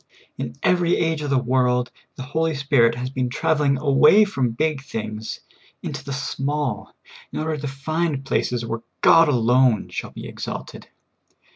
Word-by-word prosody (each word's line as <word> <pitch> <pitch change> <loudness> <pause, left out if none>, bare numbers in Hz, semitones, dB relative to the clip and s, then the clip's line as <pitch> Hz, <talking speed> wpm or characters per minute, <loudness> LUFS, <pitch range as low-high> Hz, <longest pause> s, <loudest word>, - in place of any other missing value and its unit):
In 125 -3 -5
every 175 -1 +3
age 160 -2 0
of 145 - -3
the 140 - +2
world, 125 0 +1 0.2
the 130 - -7
Holy 160 +3 -1
Spirit 135 -5 +3
has 125 +2 -4
been 130 -2 -1
traveling 150 0 +1
away 150 +9 +5
from 135 -11 -1
big 150 +4 -1
things 110 -4 -6 0.4
into - - -5
the 140 - -7
small, 135 -2 -3 0.4
in - - -6
order 155 0 -1
to 145 0 -5
find 140 +1 -2
places 120 -3 -1
where 115 0 -4 0.2
God 165 -2 +6
alone 125 -3 +3
shall - - -5
be - - -9
exalted. - - -7
135 Hz, 155 wpm, -22 LUFS, 125-155 Hz, 0.4 s, God